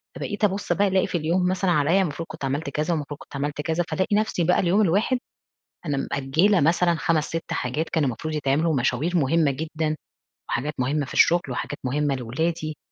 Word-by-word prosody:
فبقيت 205 0 -5
أبص 200 0 +1
بقى 205 0 +2
ألاقي 190 -1 +2
في - - -1
اليوم 170 +3 +1
مثلًا 185 -1 +1
عليّا 160 +5 +3
المفروض 165 -2 -3
كنت 160 -3 -6
عملت 140 +3 -2
كذا، 155 +4 -1
والمفروض 145 -2 -4
كنت - - -12
عملت 145 +1 -2
كذا، 165 +2 0
فألاقي 190 +2 0
نفسي 215 -5 +1
بقى 180 +2 +3
اليوم 190 +4 +3
الواحد 205 +7 +2 0.7
أنا 145 -3 -1
مأجلة 160 +8 +2
مثلًا 170 +2 +3
5 165 -2 +1
6 165 0 -5
حاجات 150 +6 -2
كان 160 -3 +1
المفروض 140 +5 -2
يتعملوا، 150 +3 +1
ومشاوير 140 +6 +1
مهمة 155 0 +3
جدًا، 155 +2 -2 0.5
وحاجات 145 +6 -1
مهمة 140 +3 0
في - - -9
الشغل، 175 +1 +5
وحاجات 135 +3 -4
مهمة 140 +2 0
لأولادي، 155 +6 -2
160 Hz, 185 wpm, -24 LUFS, 145-175 Hz, 0.7 s, الشغل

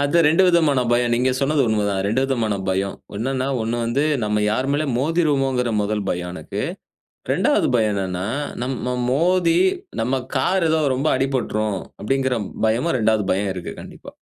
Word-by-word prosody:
அதுதான் 155 +3 +3
2 165 +5 +4
விதமான 160 -7 +3
பயம். 120 0 +2
நீங்க 125 +2 +2
சொன்னது 140 0 +2
உண்மைதா 105 -2 0
2 115 +6 +1
விதமான 115 -6 0
பயம். 95 +1 -1 0.2
என்னன்னா 130 +3 -1 0.2
1 115 +2 -2
வந்து 135 +6 0 0.2
நம்ம 105 0 0
யார் 130 +5 0
மேலயும் 145 -3 0
மோதிருவோமோங்கிற 135 -5 +1
1 105 -1 -2
பயம் 90 0 -3
எனக்கு. - - -5 0.7
2வது - - +2
பயம் 110 -3 +2
என்னன்னா 95 0 -2 0.4
நம்ம 125 -1 -3 0.2
மோதி, 170 +3 +2 0.4
நம்ம 130 +3 0
கார் 175 +6 +2
எதோ 160 0 +2
ரொம்ப 140 +4 0
அடிபட்டுரும், 110 -7 -1 0.2
அப்படிங்கிற 130 +2 0 0.3
பயமும், 125 +8 +1
2வது 110 -1 +2
பயம் 95 +1 0
இருக்கு. 90 -2 -6
கண்டிப்பா. - - -12
125 Hz, 150 wpm, -21 LUFS, 105-140 Hz, 0.7 s, 2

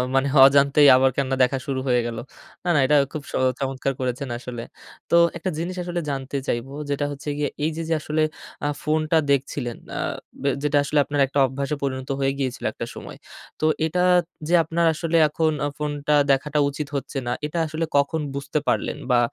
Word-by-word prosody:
মানে 135 +1 +3 0.2
অজান্তেই 140 +1 +5
আবার 130 +1 +4
কেননা 135 -1 0
দেখা 135 +2 +1
শুরু 135 -1 -1
হয়ে 125 -1 +3
গেল। 115 -1 -5 0.5
না, 180 - -2
না, 145 - +4
এটা 150 - +3 0.2
খুব 155 - -5
স - - -16 0.3
চমৎকার 135 0 -2
করেছেন 130 +1 -3
আসলে। 120 -1 -7 0.5
তো - - +3 0.2
একটা 180 +3 -3
জিনিস 175 +3 -3
আসলে 175 0 -3
জানতে 135 0 -3
চাইবো 120 +4 -2 0.2
যেটা 145 0 0
হচ্ছে 145 +1 -6
গিয়ে, 150 - 0
এই 160 - +1
যে, - - -2
যে 165 - +2
আসলে 155 +1 -1 0.4
আ - - +2 0.2
ফোনটা 155 +1 +1
দেখছিলেন, 130 -3 -1 0.2
আ - - -2 0.4
ব - - -9 0.2
যেটা 145 0 +2
আসলে 145 +1 +1
আপনার 145 -1 -2
একটা 140 - -1
অভ্যাসে 140 +3 -3
পরিণত 130 -1 -3
হয়ে 135 0 +2
গিয়েছিল 130 -2 -3
একটা - - -5
সময়। - - -9 0.4
তো 155 - 0 0.2
এটা 180 +3 0 0.4
যে 175 - 0
আপনার 165 +2 0
আসলে 165 +1 0
এখন 155 +1 0 0.3
ফোনটা 150 0 0 0.2
দেখাটা 150 +2 +1
উচিত 145 +1 -5
হচ্ছে 135 +1 -4
না। - - 0
এটা 150 +3 -4
আসলে 160 +1 -2
কখন 145 +3 +1
বুঝতে 140 +2 -2
পারলেন - - 0
বা 120 - +5
140 Hz, 190 wpm, -23 LUFS, 135-155 Hz, 0.5 s, অজান্তেই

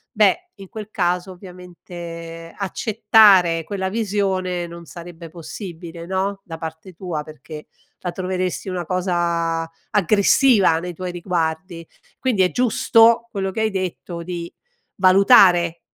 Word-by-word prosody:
beh, 220 - +2
in 195 -2 -12
quel 215 -1 -8
caso, 180 0 -1
ovviamente, 175 -2 -10
accettare 200 -4 +4
quella 190 +2 -3
visione 190 -4 -1
non 170 0 -11
sarebbe 170 0 -10
possibile, 170 -1 -9
no, 190 +2 -2
da 165 -2 -7
parte 160 +3 -8
tua 165 -3 -5
perché 155 0 -11 0.3
la 175 - -4
troveresti 185 +1 -3
una 180 -2 -4
cosa 170 -2 -1 0.2
aggressiva 205 -1 +4
nei 180 +1 -6
tuoi 180 +2 -5
riguardi. 170 -1 -3 0.4
Quindi 235 -8 +1
è 180 - +1
giusto 235 -1 +3
quello 195 -2 -2
che 220 - -3
hai 220 0 +1
detto, 180 -2 -4
di 170 0 -6 0.4
valutare 185 -3 +5
180 Hz, 125 wpm, -21 LUFS, 170-195 Hz, 0.4 s, valutare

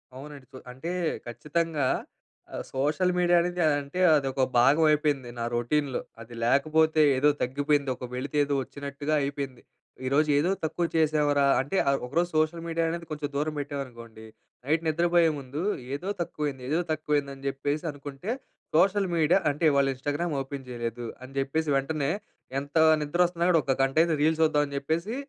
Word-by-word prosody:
అవునండి. 140 0 -10
కొ - - -8
అంటే 135 +8 -6 0.4
ఖచ్చితంగా. 150 +2 -1 0.7
ఆహ్, - - -4
సోషల్ 150 +7 +1
మీడియా 175 0 +4
అనేది 175 +1 -2 0.2
అంటే, 140 +6 -6 0.2
అదొక 135 -2 0 0.2
భాగం 140 +6 +5
అయిపోయింది 145 -4 +1
నా 115 - -1
రౌటీన్‌లో. 130 +3 0 0.2
అది 115 +1 -11
లేకపోతే 155 +5 +3
ఏదో 140 +3 +4
తగ్గిపోయింది, 140 +2 +1
ఒక 125 - -7
వెలితి 140 +4 -3
ఏదో 140 0 -1
వచ్చినట్టుగా 140 +2 -5
అయిపోయింది. 140 -2 -4 0.5
ఈరోజు 150 +3 +2
ఏదో 155 +5 +2
తక్కువ 165 +2 -1
చేసావురా, 150 -3 +3 0.2
అంటే 140 +9 -3
ఆహ్, 140 - +3
ఒకరోజు 170 +8 0
సోషల్ 155 +2 +1
మీడియా 165 0 0
అనేది 170 +1 -4
కొంచెం 150 -1 -3
దూరం 150 +2 -1
పెట్టామనుకోండి. 120 -6 -7 0.4
నైట్ 155 +3 +1
నిద్రపోయే 170 +1 +3
ముందు 140 +3 -6 0.3
ఏదో 180 +7 -5
తక్కువైంది, 145 -6 -3
ఏదో 160 +3 +1
తక్కువ 155 -1 0
అయింది 140 -1 -3
అని 135 - -16
చెప్పేసి 145 +3 -2
అనుకుంటే, 145 +5 -8 0.5
సోషల్ 195 +3 +3
మీడియా 165 +3 +4
అంటే, 145 +4 -6
ఇవాళ 140 -1 +3
ఇన్‌స్టా‌గ్రామ్ 145 +4 -2
ఓపెన్ 135 0 -7
చేయలేదు. 120 0 -4 0.2
అని 130 +1 -11
చెప్పేసి 150 +3 -1
వెంటనే 140 +1 -1 0.5
ఎంతా 145 +3 0 0.2
నిద్ర 150 +4 -3
వస్తున్నా 170 0 -1
గూడా 170 -2 +5
ఒక 135 - +1
గంట 135 +1 0
అయినా 165 -1 +2
రీల్స్ 160 +1 +2
చూద్దాం 150 -2 +3
అని 140 - -7
చెప్పేసి, 165 - -2
145 Hz, 160 wpm, -27 LUFS, 135-160 Hz, 0.7 s, భాగం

